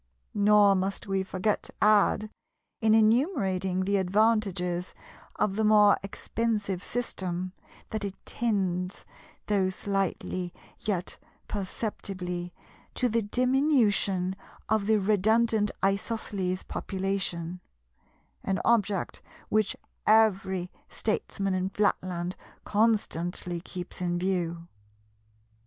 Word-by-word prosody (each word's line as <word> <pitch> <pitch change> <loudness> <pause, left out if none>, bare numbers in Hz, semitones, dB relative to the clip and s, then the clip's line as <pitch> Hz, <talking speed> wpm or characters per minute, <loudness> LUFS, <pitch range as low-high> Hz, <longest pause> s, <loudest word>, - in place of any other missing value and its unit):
Nor 205 -1 +5
must 195 +1 -1
we 195 -1 0
forget 190 +2 -1
to - - -13
add, 210 0 +4 0.5
in 220 -1 +5
enumerating 215 - +2
the 200 +1 +2
advantages 190 -3 +1 0.4
of 195 -2 0
the 220 - +1
more 210 -1 +6
expensive 200 -1 -2
system, 185 -6 -3 0.4
that 215 -2 -2
it 200 -1 -3
tends, 190 -5 -1 0.4
though 195 -3 +2
slightly 185 -2 -2 0.3
yet 190 -4 -2 0.3
perceptibly, 185 -3 -4 0.4
to 250 - +1
the 230 +1 +1
diminution 220 -6 +2 0.3
of 215 -2 +1
the 220 0 +4
redundant 215 +2 +3 0.2
Isosceles 195 -2 -1
population—an 185 -3 -2 1.1
object 205 -5 +1 0.3
which 215 -1 +1 0.3
every 195 -4 +3 0.2
statesman 195 -2 -1
in 185 0 0
Flatland 185 -3 -1 0.3
constantly 180 -5 0
keeps 180 0 -8
in 175 -1 0
view. 175 -2 -1
195 Hz, 95 wpm, -28 LUFS, 185-215 Hz, 1.1 s, more